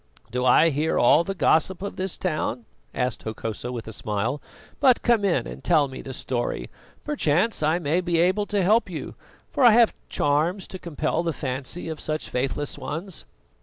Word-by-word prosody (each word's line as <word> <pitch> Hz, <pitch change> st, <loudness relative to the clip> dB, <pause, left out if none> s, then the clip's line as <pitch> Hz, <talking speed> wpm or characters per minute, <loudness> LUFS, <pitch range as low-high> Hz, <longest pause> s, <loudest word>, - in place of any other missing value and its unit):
"Do 125 Hz, +1 st, -1 dB
I 155 Hz, +6 st, +6 dB
hear 150 Hz, +3 st, 0 dB
all 150 Hz, +7 st, +5 dB
the 195 Hz, +2 st, -4 dB
gossip 180 Hz, +1 st, +2 dB
of 200 Hz, -, -5 dB
this 190 Hz, -1 st, -2 dB
town?" 155 Hz, -9 st, -2 dB, 0.3 s
asked 125 Hz, -3 st, -2 dB
Hokosa, 110 Hz, +2 st, -5 dB
with 120 Hz, -3 st, -6 dB
a 110 Hz, -, -6 dB
smile. 110 Hz, +7 st, -2 dB, 0.4 s
"But 260 Hz, -4 st, +4 dB
come 235 Hz, -3 st, +3 dB
in 195 Hz, -4 st, +1 dB
and -, -, -9 dB
tell 155 Hz, -5 st, +3 dB
me 130 Hz, -1 st, -8 dB
the 135 Hz, -, -7 dB
story; 125 Hz, -2 st, -3 dB, 0.3 s
perchance 220 Hz, -, +1 dB
I 155 Hz, +2 st, +2 dB
may 170 Hz, +1 st, 0 dB
be 175 Hz, -2 st, 0 dB
able 185 Hz, +5 st, +2 dB
to 205 Hz, -2 st, 0 dB
help 215 Hz, +3 st, +3 dB
you, 170 Hz, -, -6 dB, 0.4 s
for 275 Hz, -, +1 dB
I 240 Hz, -3 st, +8 dB
have 230 Hz, 0 st, +5 dB, 0.2 s
charms 160 Hz, +7 st, 0 dB
to 185 Hz, -, -7 dB
compel 160 Hz, -1 st, -2 dB
the 170 Hz, -1 st, -1 dB
fancy 135 Hz, +5 st, -4 dB
of 160 Hz, -1 st, -5 dB
such 155 Hz, 0 st, -4 dB
faithless 135 Hz, +3 st, -2 dB
ones." 170 Hz, +4 st, -5 dB
160 Hz, 185 wpm, -24 LUFS, 135-185 Hz, 0.4 s, I